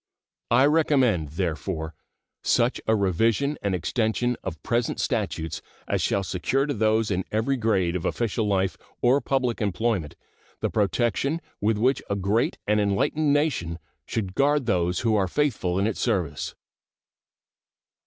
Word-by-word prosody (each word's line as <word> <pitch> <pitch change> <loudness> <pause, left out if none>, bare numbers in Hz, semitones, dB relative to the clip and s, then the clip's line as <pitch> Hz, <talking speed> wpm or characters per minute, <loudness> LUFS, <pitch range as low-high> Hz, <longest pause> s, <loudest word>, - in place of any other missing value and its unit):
I 125 +3 +5
recommend, 130 - +2
therefore, 80 -1 -3 0.5
such 120 +1 +2
a 110 - +4
revision 115 - +1
and 100 -2 0
extension 115 +6 0
of 80 -5 -6
present 120 0 0
statutes 80 -1 -2 0.3
as - - 0
shall 100 - +1
secure 95 +10 0
to 145 - -1
those 110 -1 +1
in 95 -1 0
every 110 +6 +1
grade 95 -8 +1
of 90 - -2
official 115 -2 -1
life 95 -5 +1 0.3
or 130 +4 +4
public 130 -4 0
employment 100 -5 -1 0.4
the - - -1
protection 120 - +1 0.2
with 105 +1 +2
which 130 +5 +2
a 100 - 0
great 100 +4 0
and 105 0 +2
enlightened 125 +9 +1
nation 140 - 0 0.3
should 100 -5 -3
guard 145 +3 +2
those 90 -5 +1
who 115 -2 +2
are 100 -2 +2
faithful 100 -7 0
in 100 - +2
its 110 -2 -1
service. 90 - -1
110 Hz, 145 wpm, -25 LUFS, 95-125 Hz, 0.5 s, I